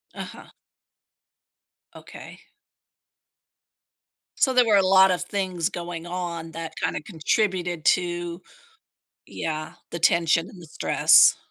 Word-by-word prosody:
Uh-huh. - - -9 1.5
Okay. - - -12 2.0
So, 260 -2 +2
there 250 -1 +4
were 215 -2 +3
a 195 - +5
lot 190 0 +5
of 180 - -1
things 185 -4 -2
going 175 -3 -7
on 170 -2 -5
that 165 -1 -7
kinda - - -2
contributed 180 -2 -2
to 175 0 0 0.8
Yeah, 155 -1 -5 0.2
the 170 - -6
tension 165 +1 +2
and 185 - -14
the 170 - -12
stress. - - +4
175 Hz, 110 wpm, -24 LUFS, 165-190 Hz, 2.0 s, a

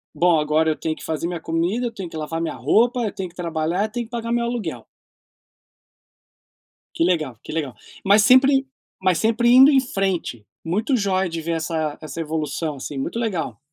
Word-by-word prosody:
bom, 175 -2 +3
agora 155 +1 +2
eu - - -1
tenho 155 0 -3
que - - -12
fazer 160 +1 -2
minha 175 -1 -4
comida, 170 +9 -1
eu 235 - -2
tenho 190 -5 -6
que 160 - -8
lavar 155 +1 -3
a - - -3
minha 165 - -3
roupa, 230 - +2
eu 215 -3 -1
tenho 185 -2 -5
que 170 - -24
trabalhar, 170 +1 -1
eu 215 - -7
tenho 240 0 -4
que - - -31
pagar 235 -1 -4
o - - +2
meu 235 0 +1
aluguel. 205 - -4 2.1
Que - - +2
legal, 155 -9 0
que - - -8
legal. 150 -6 -3 0.3
Mas 200 +2 +5
sempre 270 +4 +5 0.3
mas 185 -2 +2
sempre 230 +2 +2
indo 260 +3 +8
em 275 -2 +5
frente. 190 - -2 0.2
Muito 210 - 0
joia 190 -3 0
de 165 -1 -4
ver 165 +1 -3
essa 160 -2 -2
essa 155 +1 -7
evolução 155 -1 -3
assim, 135 +1 -6
muito 135 +11 -3
legal. 180 - -2
175 Hz, 205 wpm, -22 LUFS, 160-225 Hz, 2.1 s, indo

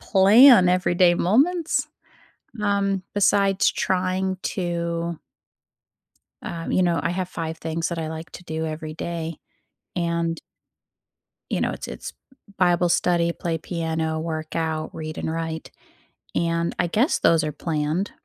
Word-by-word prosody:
plan 205 +1 +7
everyday 180 -1 +3
moments, 310 - +2 0.8
um, 200 -2 +1
besides 200 -1 +3
trying 185 0 -1
to 170 -2 -2 1.2
um, 165 -1 -5
you 185 - +3
know, 170 -2 +2
I - - 0
have 180 0 -2
5 160 -2 -5
things 165 0 -2
that 170 - -4
I 160 -1 -3
like 160 +1 -7
to 180 - -10
do 160 -1 -3
every 155 0 -5
day. 165 -1 -4 0.6
And 170 -1 -1 1.1
you - - 0
know, - - +1
it's - - -6
it's - - -7 0.5
bible 175 -1 +3
study, 170 -1 +2
play 165 -1 -3
piano, 160 -1 -2
workout, 160 0 -3
read 155 -1 -6
and - - -2
write. 160 0 -4 0.7
And 170 0 0
I 175 - +2
guess 225 - +2
those 165 -1 +4
are 155 - -2
planned, 155 +4 -2
170 Hz, 130 wpm, -23 LUFS, 160-185 Hz, 1.2 s, plan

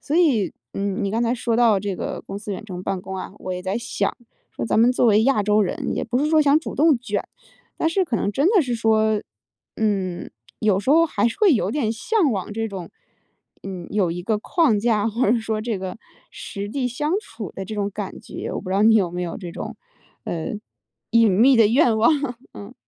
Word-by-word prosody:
所 300 - -2
以， 260 - +3 0.2
嗯， 195 0 -2
你 195 - -1
刚 230 +2 0
才 235 +1 +1
说 235 -1 -1
到 230 -3 +4
这 195 -1 -3
个 - - -5
公 195 - -7
司 205 0 -8
远 215 - -8
程 185 -4 -7
办 190 -2 -3
公 190 - -7
啊， 190 - -6
我 185 - -5
也 180 0 -5
在 190 +2 -2
想， 215 -4 -2 0.3
说 - - -5
咱 225 - +2
们 240 - +5
作 250 - +1
为 220 -1 +5
亚 265 -6 +3
洲 210 +1 +3
人， 185 - -2
也 - - -2
不 245 +2 -1
是 290 - +1
说 315 - +5
想 295 0 +5
主 - - -7
动 300 -4 +4
卷， 210 -4 -2 0.5
但 - - -1
是 355 +4 +2
可 285 -10 -1
能 205 - -1
真 285 - +2
的 400 -6 +4
是 245 -3 -2
说， 220 -2 +2 0.5
嗯， 195 -5 -1 0.3
有 205 -3 +2
时 205 - -7
候 325 +4 +6
还 230 -8 +1
是 230 - -7
会 410 -5 +5
有 210 -6 +1
点 235 -5 0
向 320 - +1
往 200 +1 -4
这 225 +1 -2
种， 185 -4 -7 0.7
嗯， 185 -3 -7
有 195 -5 +1
一 175 +1 -4
个 215 +2 0
框 260 - +2
架， 220 -2 +1
或 225 0 +1
者 235 - +3
说 220 -1 -2
这 220 -2 -2
个 185 +1 -5 0.3
实 200 0 -6
地 250 +2 -1
相 295 +7 -2
处 225 - -8
的 195 - -6
这 215 +3 -6
种 205 -1 -1
感 200 -1 -6
觉， - - -7
我 - - -3
不 185 -1 -7
知 - - 0
道 200 - +3
你 220 0 +6
有 190 -5 +3
没 180 +1 -4
有 170 - -4
这 175 -4 -8
种， - - -6 0.5
呃， 165 +4 -3 0.6
隐 230 -2 +5
秘 240 +7 +5
的 225 - +6
愿 235 0 +3
望。 225 +8 +4 0.4
嗯。 205 +5 -10
220 Hz, 250 characters per minute, -22 LUFS, 195-245 Hz, 0.7 s, 候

